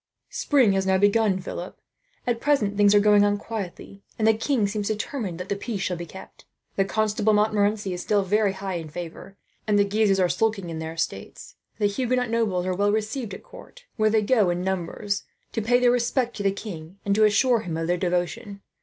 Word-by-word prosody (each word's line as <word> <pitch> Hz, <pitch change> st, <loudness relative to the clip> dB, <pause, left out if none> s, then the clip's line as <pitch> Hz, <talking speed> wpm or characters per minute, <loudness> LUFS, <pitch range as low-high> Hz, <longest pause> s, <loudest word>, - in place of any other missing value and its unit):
"Spring 265 Hz, -8 st, +3 dB
has 190 Hz, 0 st, 0 dB
now 190 Hz, 0 st, +3 dB
begun, 205 Hz, 0 st, +3 dB
Philip. 180 Hz, 0 st, -7 dB, 0.5 s
At 235 Hz, -2 st, -1 dB
present 250 Hz, -9 st, +1 dB
things 205 Hz, 0 st, +5 dB
are -, -, +7 dB
going 205 Hz, 0 st, +5 dB
on 205 Hz, 0 st, +2 dB
quietly, 200 Hz, -2 st, -7 dB, 0.2 s
and 220 Hz, -, +1 dB
the 220 Hz, -, +6 dB
king 225 Hz, 0 st, 0 dB
seems 205 Hz, 0 st, -3 dB
determined 215 Hz, -, -3 dB
that 180 Hz, -, -5 dB
the 200 Hz, -, -1 dB
peace 200 Hz, 0 st, -4 dB
shall 185 Hz, -, -1 dB
be 170 Hz, 0 st, -7 dB
kept. 190 Hz, +4 st, -13 dB, 0.3 s
The 195 Hz, -, +2 dB
Constable 215 Hz, +1 st, +1 dB
Montmorency 210 Hz, -1 st, +1 dB
is 180 Hz, -, -4 dB
still 205 Hz, 0 st, +1 dB
very 205 Hz, +1 st, +1 dB
high 190 Hz, -2 st, -4 dB
in 160 Hz, -2 st, -7 dB
favour, 175 Hz, +4 st, -8 dB, 0.3 s
and 210 Hz, -1 st, +3 dB
the 205 Hz, -, +5 dB
Guises 200 Hz, -1 st, +2 dB
are 185 Hz, -, +4 dB
sulking 200 Hz, -3 st, -1 dB
on 160 Hz, -, -5 dB
their 160 Hz, 0 st, -5 dB
estates. 165 Hz, -, -5 dB, 0.2 s
The 210 Hz, -, 0 dB
Huguenot 250 Hz, +3 st, 0 dB
nobles 210 Hz, -6 st, 0 dB
are 185 Hz, -, 0 dB
all 180 Hz, -, -3 dB
well 205 Hz, 0 st, +3 dB
received 220 Hz, +2 st, -2 dB
at -, -, -12 dB
court, -, -, -14 dB
where 215 Hz, -2 st, +2 dB
they 215 Hz, 0 st, +2 dB
go 210 Hz, -4 st, +3 dB
in 175 Hz, +1 st, -1 dB
numbers, 190 Hz, +2 st, -2 dB, 0.3 s
to 225 Hz, -, -2 dB
pay 245 Hz, +3 st, +3 dB
their 245 Hz, -1 st, +4 dB
respect 245 Hz, 0 st, 0 dB
to -, -, -4 dB
the 200 Hz, -1 st, +2 dB
king 185 Hz, -4 st, -8 dB
and 200 Hz, -, +2 dB
to 215 Hz, +2 st, +3 dB
assure 230 Hz, +3 st, +4 dB
him 170 Hz, -6 st, -4 dB
of 165 Hz, -, -2 dB
their 175 Hz, +2 st, +1 dB
devotion. 190 Hz, +4 st, -2 dB
205 Hz, 215 wpm, -25 LUFS, 190-220 Hz, 0.5 s, are